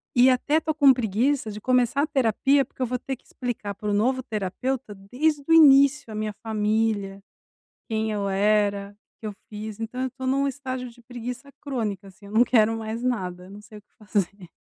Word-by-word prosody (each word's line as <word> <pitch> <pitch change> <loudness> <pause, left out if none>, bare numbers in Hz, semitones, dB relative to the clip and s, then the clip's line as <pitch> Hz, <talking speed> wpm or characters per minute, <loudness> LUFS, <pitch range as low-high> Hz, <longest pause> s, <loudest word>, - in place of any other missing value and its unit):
e 250 +2 +7
até 285 +5 +2
estou 315 0 -1
com 280 -3 +6
preguiça 235 +1 0
de 210 - -7
começar 255 +2 +2
a - - 0
terapia 270 0 +2
porque - - -14
eu - - +3
vou 250 +1 -1
ter 265 -2 -5
explicar 225 -5 -5
pro 210 +1 -3
novo 255 +5 +1
terapeuta 215 +3 -3
desde 280 +10 -1
o - - 0
início 280 -4 +6
a - - -6
minha 215 -1 -3
família, 210 -2 0 0.7
quem 220 0 -1
eu 200 -2 -1
era, 200 0 +1 0.3
o - - -61
que 220 - -6
eu - - -5 0.2
fiz, 215 0 -7
então 225 +3 -5
eu 260 - 0
estou 260 +1 -7
num 275 +1 +2
estágio 255 -2 -5
de 240 +1 -19
preguiça 245 +2 -7
crônica 215 -8 -4
assim, 200 +2 -16
eu 205 - -11
não 225 +2 +5
quero 225 -2 +3
mais 225 +1 -5
nada, 180 -7 -2
eu 190 - -14
não 205 +1 -10
sei 210 0 -13
o - - -17
que - - -49
fazer. 200 -4 -3
225 Hz, 205 wpm, -25 LUFS, 210-260 Hz, 0.7 s, e